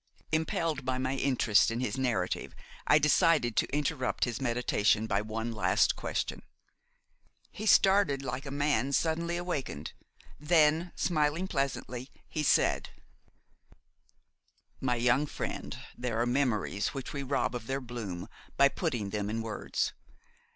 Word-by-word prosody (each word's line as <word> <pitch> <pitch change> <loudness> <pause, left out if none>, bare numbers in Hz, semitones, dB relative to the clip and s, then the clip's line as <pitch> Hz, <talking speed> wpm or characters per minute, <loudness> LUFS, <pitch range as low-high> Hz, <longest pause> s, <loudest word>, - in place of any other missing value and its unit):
Impelled 160 -2 0
by 130 0 -1
my 130 +1 -1
interest 130 -6 +3
in 115 +1 -2
his 125 -3 -1
narrative, 130 -3 -1 0.3
I 150 - +7
decided 150 - +3
to - - +1
interrupt 145 -2 -1
his 120 +2 -1
meditation 115 -4 +2
by 100 -2 0
one 110 +2 -4
last 110 - +2
question. - - -3 1.1
He 215 - -5
started 190 -10 +4
like 130 +2 -4
a - - -4
man 140 -1 0
suddenly 170 +3 0
awakened; 145 - -4 0.5
then, 160 +2 +3
smiling 155 +2 +1
pleasantly, 135 -4 -3 0.2
he 155 - -3
said: 150 - +2 1.9
"My 125 -2 0
young 125 +5 +2
friend, - - -5 0.2
there 120 -2 -2
are 120 - +2
memories 120 -4 0
which 135 - -5
we 140 - -3
rob 135 -1 0
of 120 -2 -5
their 135 +1 -1
bloom 115 -9 -6 0.3
by 140 0 +6
putting 120 - -2
them 105 0 -2
in 115 +1 -2
words. 110 -2 -2
135 Hz, 135 wpm, -30 LUFS, 120-150 Hz, 1.9 s, I